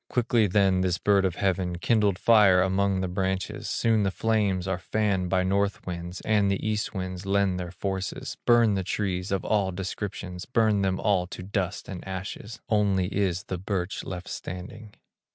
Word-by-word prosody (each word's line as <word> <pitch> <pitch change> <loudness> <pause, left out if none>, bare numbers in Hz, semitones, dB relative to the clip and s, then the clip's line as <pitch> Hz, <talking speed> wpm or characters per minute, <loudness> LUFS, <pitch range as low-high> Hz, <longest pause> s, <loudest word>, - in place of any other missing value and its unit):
Quickly 120 -3 +2
then 95 -1 +3
this 90 -2 +1
bird 100 0 +3
of 90 - 0
heaven, 90 -2 0
Kindled 105 0 +2
fire 105 -5 +5
among 95 0 +1
the 95 - -1
branches; 95 +1 -2
Soon 115 -2 +2
the 100 - +2
flames 100 -3 0
are 95 -1 -1
fanned 95 -1 0
by 95 0 +2
north 100 +1 0
winds, 90 0 -6
And 105 -2 +2
the 100 +2 -1
east 110 0 -2
winds 95 0 -5
lend 100 -2 +2
their 90 -1 -4
forces, 95 +1 -4
Burn 120 -3 +5
the 95 -1 -1
trees 90 -1 -2
of 95 -2 -1
all 100 -3 +1
descriptions, 90 -1 -5
Burn 110 -4 +2
them 95 -1 0
all 95 -4 +1
to 90 - -8
dust 95 -1 -3
and 90 -3 -7
ashes, 95 +4 -6
Only 100 -3 +1
is 95 -3 0
the 95 - -5
birch 95 -1 -3
left 90 -1 -6
standing. 100 +4 -7
95 Hz, 175 wpm, -26 LUFS, 90-105 Hz, -, fire